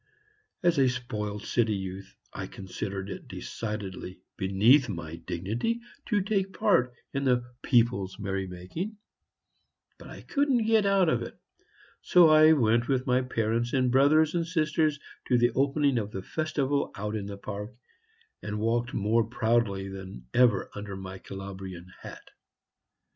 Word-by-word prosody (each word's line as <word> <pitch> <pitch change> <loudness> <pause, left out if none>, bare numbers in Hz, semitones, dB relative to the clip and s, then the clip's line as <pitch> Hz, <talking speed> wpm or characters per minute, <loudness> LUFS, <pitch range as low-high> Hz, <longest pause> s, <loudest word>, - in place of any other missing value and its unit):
As 170 -4 +3
a 130 -2 +5
spoiled 105 -5 -4
city 110 -2 +1
youth, 95 0 -7 0.2
I - - -5
considered 95 0 -5
it - - -8
decidedly 100 -4 -6 0.2
beneath 110 +8 +4
my 85 -4 -5
dignity 110 - -2 0.3
to 210 -3 +2
take 195 -2 -1
part 125 0 +2 0.2
in 140 0 -1
the 125 -2 +2 0.2
people's 115 -7 +2
merry 95 -2 -3
making; 95 - -6 1.0
but - - -11
I - - -10
couldn't 275 -5 +1
get 220 -2 +3
out 195 -2 +4
of 125 -7 +2
it, 115 - -6
and - - -31 0.6
so 175 -3 +6
I 155 +1 +7
went 120 -4 +2
with 130 -2 +1
my 125 0 +3
parents 115 -1 -1
and 130 -2 +2
brothers 150 +4 +4
and 170 -1 0
sisters 155 -2 +1 0.3
to 125 - +4
the 120 0 +3
opening 140 -1 +2
of 105 -2 -4
the 95 -3 -6
festival 145 0 -1
out 105 +1 -3
in 100 -2 -4
the 100 -1 -6
park, 105 +3 -6 0.7
and 105 0 -4
walked 115 +3 0
more 110 +3 +2
proudly 115 -5 0
than 95 -10 -9
ever 120 -6 +3
under 100 -1 -6
my 95 0 -8
Calabrian 95 -2 -8
hat. - - -11
115 Hz, 150 wpm, -28 LUFS, 100-140 Hz, 1.0 s, I